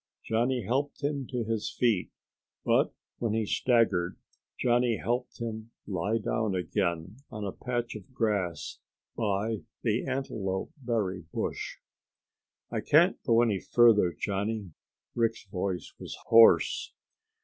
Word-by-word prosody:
Johnny 120 +2 +1
helped 140 +8 -1
him 140 -3 -1
to 125 -3 -2
his 110 -1 -2
feet, 115 -7 +1 0.6
but - - +3 0.3
when 115 -3 0
he 110 -1 +1
staggered, 110 -7 +2 0.4
Johnny 120 -2 +2
helped 125 +2 -2
him 110 -1 -5 0.2
lie 100 +3 0
down 110 -2 -1
again 90 0 -1
on 105 -3 -5
a 100 - -2
patch 120 +1 -3
of 105 +2 -10
grass 105 -8 -1 0.4
by 110 0 -1 0.2
the 115 +2 0
antelope 110 -8 -2
berry 110 - -2
bush. - - -3 1.0
"I - - -1
can't - - +4
go 115 0 +4
any 105 -5 +1
farther, 110 -4 +5
Johnny." 100 +2 -3 0.4
Rick's 115 -2 0
voice 95 -2 -3
was - - -7
hoarse. 115 - +6
110 Hz, 125 wpm, -29 LUFS, 100-120 Hz, 1.0 s, hoarse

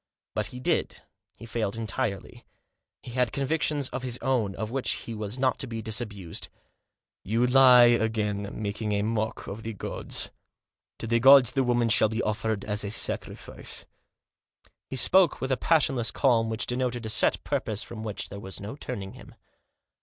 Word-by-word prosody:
But 110 -1 -1
he 125 - -8
did, 125 - -1 0.3
he - - -11
failed 110 -2 -2
entirely. 110 -2 -4 0.6
He 120 - -9
had 125 -2 0
convictions 145 0 0
of 130 - -5
his 125 -2 -3
own, 115 -8 0
of 110 +3 -5
which 135 0 -1
he 115 - -7
was 105 +1 -4
not 130 -1 +1
to 130 - -4
be 115 -2 -5
disabused. 105 -6 -4 0.4
" - - -58 0.3
You 115 +5 +1
lie 125 -1 +7
again, 110 -4 +1
making 105 0 -3
a 100 0 0
mock 110 0 -2
of 105 +3 -7
the 115 0 -5
gods. 100 - -4 0.7
To - - -5
the 115 +1 +1
gods 135 -1 +7
the 135 -2 +1
woman 120 -1 +1
shall 110 0 +5
be 110 +2 -2
offered 110 -1 -2
as 105 0 0
a 100 - -3
sacrifice." 105 - 0 1.0
He - - -5
spoke 175 +6 +4
with 130 - -3
a - - +3
passionless 135 -8 +1
calm 115 -3 +2
which 110 -1 -1
denoted 125 -1 -2
a - - -3
set 110 - +2
purpose 105 -2 -2
from 115 -2 -8
which 105 -2 -4
there 100 - -8
was 95 -1 -6
no 105 +6 -7
turning 105 -9 -6
him. - - -14
115 Hz, 175 wpm, -27 LUFS, 105-125 Hz, 1.0 s, lie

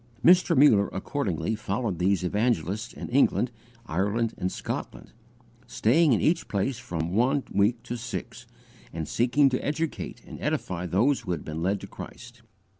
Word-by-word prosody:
Mr. 175 -1 +6
Muller 110 -8 +6
accordingly 95 - -2
followed 105 -3 -2
these 95 +1 +2
evangelists 105 +1 0
in - - -7
England, 125 -1 +3 0.3
Ireland, 105 +6 0
and 90 - -2
Scotland, - - -6 0.6
staying 150 +7 +3
in 115 - +4
each 165 +1 +1
place 110 +5 -1
from 85 -6 -4
one 130 +6 +2
week 110 +4 +2
to 120 - -5
six, 120 0 -6 0.4
and 80 -2 -4
seeking 125 - +3
to 125 - -2
educate 160 +2 -3
and - - -10
edify 90 -1 -2
those 120 - +2
who 90 - -3
had 80 - -5
been 80 +1 -5
led 95 +3 0
to - - -8
Christ. 120 0 -11
115 Hz, 155 wpm, -27 LUFS, 95-125 Hz, 0.6 s, Mr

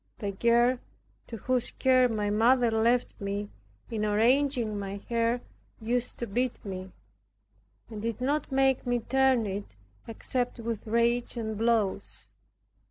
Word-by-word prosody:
The 200 -2 -3
girl 235 +4 +3 0.5
to 230 - -7
whose 250 +3 0
care 255 -1 +3
my 210 -2 -1
mother 235 +2 +4
left 235 +2 +2
me, 200 +1 -3 0.4
in 220 -2 -2
arranging 230 +1 +2
my 200 0 -4
hair 235 +1 +1 0.4
used 240 +2 -1
to 235 - -3
beat 240 +3 -2
me, 190 -1 -6 1.0
and 215 -2 -7
did 230 0 -3
not 285 +4 -1
make 265 -1 +2
me 245 0 +2
turn 260 0 +2
it 195 - -5 0.3
except 245 +2 -1
with 230 -2 -5
rage 235 +2 +1
and 220 -2 -3
blows. 220 -3 0
235 Hz, 135 wpm, -28 LUFS, 215-250 Hz, 1.0 s, mother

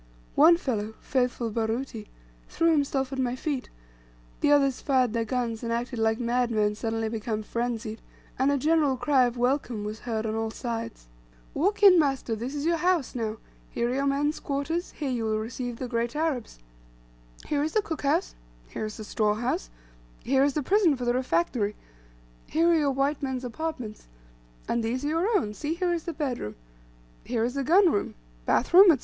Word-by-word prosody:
One 330 +3 +7
fellow, 220 - -3
faithful 245 -3 -1
Baruti, 225 0 -3 0.4
threw 330 0 +2
himself 275 -3 0
at 265 - -3
my 250 -1 0
feet, 270 -1 -3 0.7
the 290 - +3
others 275 -3 +3
fired 255 -5 +2
their 230 -1 0
guns 230 -1 -2
and 230 - -3
acted 240 +1 -2
like 225 +1 +2
madmen 235 -3 +1
suddenly 225 +1 -2
become 220 -1 -3
frenzied, 230 -1 -3 0.4
and 270 +2 +3
a 285 - +2
general 295 -1 +2
cry 255 +1 +3
of 245 0 -3
"welcome" 245 -3 0
was 210 +1 -5
heard 225 -2 -3
on 215 - -1
all 225 0 -1
sides. 230 -1 -5 0.5
"Walk 400 +7 0
in, 370 -4 +9
master, 270 -6 0
this 245 +6 -5
is 290 +1 -3
your 335 0 +2
house, 350 -4 +1
now; 225 -3 -3 0.3
here 235 +1 -1
are - - -1
your 275 +1 0
men's 290 +2 0
quarters; 290 +5 -2
here 285 -4 -3
you 240 -2 -1
will 220 -1 0
receive 240 +2 -4
the 255 - -4
great 235 +2 -2
Arabs, 300 - -2 0.9
here 290 -1 0
is 310 +2 -1
the 430 - +3
cook 325 -6 -4
house; 275 - +1 0.4
here - - -4
is 215 - -6
the 215 - -6
store 210 0 +1
house; 215 - -2 0.5
here 270 +1 +3
is 285 0 +2
the 300 - 0
prison 370 -1 +4
for 250 -1 -4
the 240 - +2
refractory; 210 -2 0 0.7
here 335 +2 +3
are - - +5
your 295 -3 +2
white 275 +2 0
man's 260 -2 -3
apartments; 250 - -5 0.6
and 235 -1 0
these 250 +5 -2
are - - 0
your 365 +8 +2
own: 210 - -2
see, 300 +8 -3
here 355 0 0
is 335 -2 -3
the 340 - -2
bedroom, 255 - -3 0.7
here 230 -2 -1
is 245 +1 -1
the 275 0 -1
gun 355 +5 +5
room, 205 - -1 0.3
bath 260 - +1
room, 385 +3 +10
&c." - - -22
255 Hz, 190 wpm, -27 LUFS, 225-295 Hz, 0.9 s, room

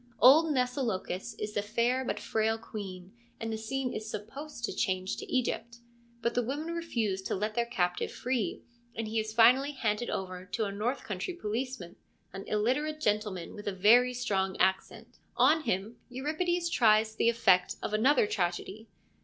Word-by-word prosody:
Old 290 +7 +8
Mnesilochus 250 -8 -1
is 210 0 -4
the 205 - 0
fair 235 +5 0
but - - -3
frail 220 0 0
queen, 195 -4 -8 0.3
and 225 0 -3
the - - -2
scene 255 +3 -2
is 215 0 -5
supposed 235 +6 -7
to - - -4
change 185 -4 -1
to - - -8
Egypt. 235 -2 -1 0.5
But 235 - +1
the 245 - +2
women 290 +7 -3
refuse 230 - -1
to - - -2
let 210 +3 -2
their 235 +1 0
captive 180 -7 -1
free, 250 -4 -2 0.3
and 225 -1 -3
he 220 +1 0
is 215 0 -3
finally 250 +6 +5
handed 230 -3 -1
over 185 -1 -4
to 215 +3 -2
a 200 - -3
north 230 +7 -2
country 210 - -4
police 255 -1 -3
man, 175 -2 -10 0.4
an 195 0 -7
illiterate 260 +9 0
gentleman 210 - -1
with 205 - -9
a 200 - -1
very 240 +6 +5
strong 195 -6 -1
accent. 190 +1 -1 0.2
On 315 0 +4
him 195 +5 -2
Euripides 320 +7 -1
tries 220 -1 +4
the 230 - +3
effect 225 -6 +3
of - - -3
another 250 +4 +4
tragedy. 195 +3 -3
225 Hz, 170 wpm, -30 LUFS, 205-255 Hz, 0.5 s, Old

